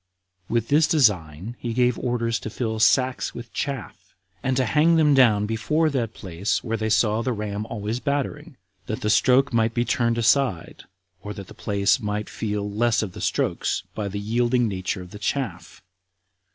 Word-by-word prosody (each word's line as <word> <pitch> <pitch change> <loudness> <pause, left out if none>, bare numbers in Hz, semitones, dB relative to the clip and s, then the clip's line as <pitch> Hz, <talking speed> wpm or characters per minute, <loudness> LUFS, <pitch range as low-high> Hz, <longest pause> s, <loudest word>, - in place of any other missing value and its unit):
With 115 -1 0
this 150 +2 +4
design 105 - +1
he 120 - -3
gave 125 -2 +2
orders 115 -2 -1
to 110 - -6
fill 110 -1 -3
sacks 130 +3 +2
with 120 -1 -9
chaff, 140 -5 -5 0.3
and 130 -1 0
to 130 - +2
hang 155 +7 +3
them 155 -3 +4
down 115 -6 +5
before 130 +9 0
that 120 -5 -2
place 95 +2 -2
where 115 -1 -2
they 110 0 -2
saw 110 0 +2
the 130 - -1
ram 105 -1 -4
always 110 +2 -3
battering, 145 +2 -3 0.3
that 110 - -4
the 105 - +1
stroke 130 +4 +4
might 115 0 +1
be 120 0 +1
turned 115 -1 +1
aside, 115 - +1 0.4
or 105 0 -7
that 100 - -8
the - - -11
place 100 -1 +1
might 105 0 -3
feel 105 -2 -3
less 110 +2 +1
of 100 - -5
the - - -9
strokes - - -1
by 105 -2 -3
the 100 +1 -4
yielding 120 +3 +1
nature 95 -2 -3
of 90 - -14
the 105 - -9
chaff. 100 -5 -4
115 Hz, 180 wpm, -24 LUFS, 105-125 Hz, 0.4 s, down